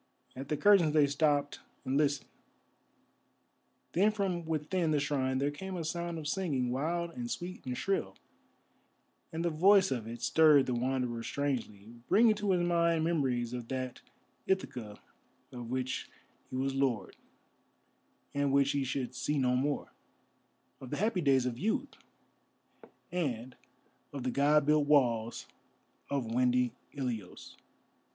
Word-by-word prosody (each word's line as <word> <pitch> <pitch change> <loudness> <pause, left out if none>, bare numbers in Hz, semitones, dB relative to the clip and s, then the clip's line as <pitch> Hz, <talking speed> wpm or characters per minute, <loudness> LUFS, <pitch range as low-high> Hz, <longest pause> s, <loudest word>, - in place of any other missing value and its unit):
At 135 +1 -7
the 150 - 0
curtains 190 -6 +5
they 150 -2 +5
stopped 145 0 +1 0.3
and 130 - -1
listened. 145 -1 +1 1.7
Then 195 +5 +4
from 190 -5 -2
within 160 +2 -1
the 150 -1 +2
shrine 135 -2 0
there 140 +2 0
came 190 +6 -6
a 165 - -4
sound 170 +1 -3
of 155 -2 -5
singing 145 -8 -1
wild 170 +6 -1
and 240 +3 -6
sweet 185 -5 -5
and 125 -1 -3
shrill, 95 - -1 1.2
and 165 +1 -3
the 170 - +1
voice 190 +4 +5
of 120 -4 -2
it 120 +1 -7
stirred 150 -4 +5
the 125 - -1
Wanderer 125 -1 -1
strangely, 115 -6 -3 0.2
bringing 220 +3 +6
to 210 -1 -3
his 180 -2 +3
mind 170 -2 +2
memories 130 -8 0
of 120 -2 -5
that 130 -1 -4 0.5
Ithaca 125 - -2 0.5
of 120 -2 -7
which 130 0 -3 0.4
he - - -6
was 135 +1 -1
Lord 130 -7 -1 1.2
and 140 -1 +1
which 140 0 +3
he 140 -1 0
should 130 -1 -3
see 130 +4 -1
no 125 -2 +2
more; 140 +3 -1 0.9
of 130 - -9
the - - -3
happy 210 -2 +1
days 135 -4 +3
of 120 -2 -3
youth, 260 +7 -1 1.2
and 130 -8 -3 0.6
of 140 -3 -6
the 130 - -1
God 145 +2 +3
built 150 -1 +3
walls 120 -6 +2 0.6
of 140 -3 -1
windy 125 +1 +2 0.2
Ilios. 120 -9 -5
140 Hz, 145 wpm, -31 LUFS, 125-170 Hz, 1.7 s, bringing